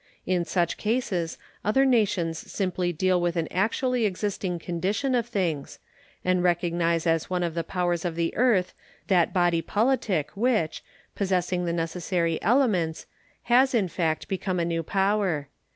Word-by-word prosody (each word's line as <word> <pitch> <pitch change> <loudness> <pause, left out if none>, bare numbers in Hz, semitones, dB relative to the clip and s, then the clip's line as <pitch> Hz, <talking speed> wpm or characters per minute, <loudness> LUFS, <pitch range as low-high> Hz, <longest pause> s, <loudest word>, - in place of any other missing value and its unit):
In 180 -2 0
such 175 -1 0
cases 210 -7 -1 0.3
other 265 +6 +3
nations 200 -10 +1
simply 185 -2 -1
deal 180 +2 +1
with 175 0 0
an 165 -2 0
actually 230 +5 +1
existing 190 -2 -2
condition 190 +11 -1
of 240 -2 +1
things, 175 -11 -2 0.5
and 185 0 +2
recognize 170 -1 +1
as 165 -1 +1
one 180 -1 0
of 170 -2 -1
the 165 0 -2
powers 175 -2 -1
of 175 -3 -2
the 165 0 -1
earth 220 -7 +2 0.4
that 180 -3 +3
body 175 -3 +2
politic 205 - 0
which, 215 -7 0 0.3
possessing 180 -2 0
the 170 - 0
necessary 170 0 -1
elements, 205 - +1 0.4
has 255 +2 +4
in 205 -5 +2
fact 165 -3 -1
become 190 -1 -2
a 170 - +1
new 165 -1 -1
power. 190 -5 0
180 Hz, 150 wpm, -26 LUFS, 170-205 Hz, 0.5 s, has